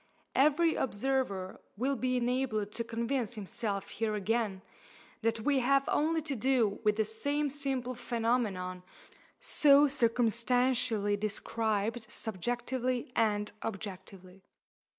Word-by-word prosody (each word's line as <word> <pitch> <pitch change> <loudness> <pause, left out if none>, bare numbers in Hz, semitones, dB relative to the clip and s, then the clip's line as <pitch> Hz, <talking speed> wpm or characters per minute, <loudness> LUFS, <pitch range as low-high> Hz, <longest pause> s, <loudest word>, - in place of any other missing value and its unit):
Every 305 +4 +4
observer 215 -6 -1 0.2
will 265 +5 0
be 255 0 0
enabled 240 -4 0
to 230 - -2
convince 235 0 -2
himself 200 -1 -3
here 220 -2 -1
again 210 -2 -1 0.6
that 230 0 0
we 280 +3 +2
have 275 +2 +3
only 320 +2 +1
to 295 -3 -2
do 240 -4 +1
with 210 -1 +3
the 220 0 +1
same 285 +7 -1
simple 265 -3 -2
phenomenon 225 -7 -1 0.6
so 295 - +5
circumstantially 235 -3 +1
described 220 +1 -2
subjectively 245 +5 -2
and 210 -2 +1
objectively. 190 -2 -7
230 Hz, 110 wpm, -31 LUFS, 210-260 Hz, 0.6 s, so